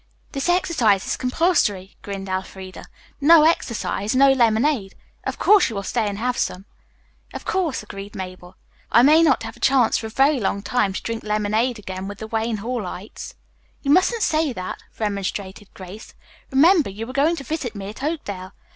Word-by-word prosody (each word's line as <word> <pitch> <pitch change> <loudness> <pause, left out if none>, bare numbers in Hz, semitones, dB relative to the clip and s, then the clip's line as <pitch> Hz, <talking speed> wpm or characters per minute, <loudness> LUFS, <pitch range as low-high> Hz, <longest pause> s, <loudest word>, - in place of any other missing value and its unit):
"This 275 +5 -2
exercise 250 - +2
is - - -1
compulsory," 250 - 0
grinned 195 -1 -6
Elfreda. 190 0 -6 0.4
"No 315 +2 +7
exercise, 235 -8 0
no 275 +1 +6
lemonade. 235 -3 +2 0.3
Of - - -3
course, 410 -7 +5
you 225 - -6
will 200 - -3
stay 220 +2 -1
and 200 -1 -3
have 245 +3 -1
some." 185 +2 -2 0.7
"Of - - -7
course," 345 - -1
agreed 200 -1 -9
Mabel. 185 -1 -8 0.4
"I 235 - +6
may 305 +4 +6
not 300 -8 +3
have 225 - -7
a - - -18
chance 260 -4 +3
for 220 - -5
a - - -8
very 270 +4 +3
long 200 -1 -1
time 210 -2 +1
to - - -5
drink 230 -1 -4
lemonade 215 +3 0
again 190 -2 -6
with 205 0 -7
the 220 - -7
Wayne 225 0 -2
Hallites." 210 -3 -6 0.5
"You 280 - +1
mustn't 400 +7 +3
say 310 -2 +1
that," 185 -4 -6 0.2
remonstrated 200 -1 -4
Grace. 190 +3 -11 0.3
"Remember, 310 - +4
you 215 +4 -7
are 255 - -7
going 295 +5 +2
to 275 - -7
visit 285 -7 -4
me 195 -1 -6
at 215 - -10
Oakdale. 205 - -4
225 Hz, 180 wpm, -22 LUFS, 200-275 Hz, 0.7 s, No